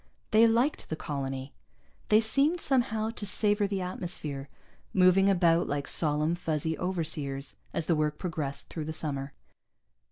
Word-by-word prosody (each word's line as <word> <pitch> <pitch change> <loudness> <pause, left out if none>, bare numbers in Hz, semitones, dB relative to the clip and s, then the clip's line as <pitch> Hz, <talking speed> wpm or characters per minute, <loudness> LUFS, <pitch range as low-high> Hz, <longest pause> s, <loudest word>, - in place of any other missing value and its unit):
They 225 +1 +6
liked 240 +6 +1
the 160 - -2
colony. 135 -3 -5 0.6
They 215 +1 +6
seemed, 280 +10 +2
somehow, 225 -6 +1
to 230 - -7
savor 205 0 +2
the 195 -1 -2
atmosphere, 160 -6 -5 0.5
moving 190 +1 +5
about 175 -3 +3
like 145 -1 -2
solemn, 150 +1 +3
fuzzy 160 -2 -2
overseers 155 -6 -2 0.2
as 165 - -2
the 170 - +2
work 150 -1 0
progressed 150 -6 -4
through 155 -2 -5
the 160 - -4
summer. 140 -3 -3
170 Hz, 140 wpm, -29 LUFS, 150-205 Hz, 0.6 s, They